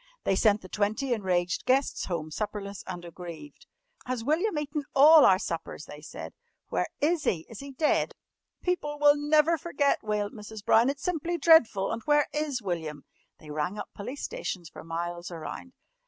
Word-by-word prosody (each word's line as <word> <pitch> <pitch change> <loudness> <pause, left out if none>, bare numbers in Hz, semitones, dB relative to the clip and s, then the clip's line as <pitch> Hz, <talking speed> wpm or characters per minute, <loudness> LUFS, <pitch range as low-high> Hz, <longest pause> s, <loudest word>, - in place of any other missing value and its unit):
They 195 - +2
sent 210 +1 +3
the - - -9
twenty 215 +7 0
enraged 180 -5 0
guests 265 +2 +2
home 160 -3 -4
supperless 200 +1 -4
and 175 -2 -6
aggrieved. 175 - -10 0.4
"Has 250 -2 -2
William 320 - +1
eaten 295 0 -2
all 300 +2 +9
our 190 - +6
suppers?" 165 -4 -5
they 150 0 -11
said. 155 0 -8 0.4
"Where - - 0
is 315 +1 +1
he? 165 -4 0
Is 225 - -8
he 275 0 -8
dead?" 300 +3 +1 0.5
"People 295 -5 -1
will 290 0 +6
never 305 +2 +3
forget," 285 -4 +1
wailed 210 -1 -1
Mrs. 210 -1 -9
Brown. 230 +4 +5
"It's 280 0 -4
simply 345 0 -1
dreadful. 280 - +5
And 225 - -3
where 295 0 +4
is 295 -6 -2
William?" 160 -6 -4 0.3
They 150 - -11
rang 155 +7 -2
up - - -6
police 250 +8 -7
stations 190 - -4
for - - -11
miles 170 +1 -4
around. 175 +10 -7
220 Hz, 170 wpm, -28 LUFS, 180-295 Hz, 0.5 s, all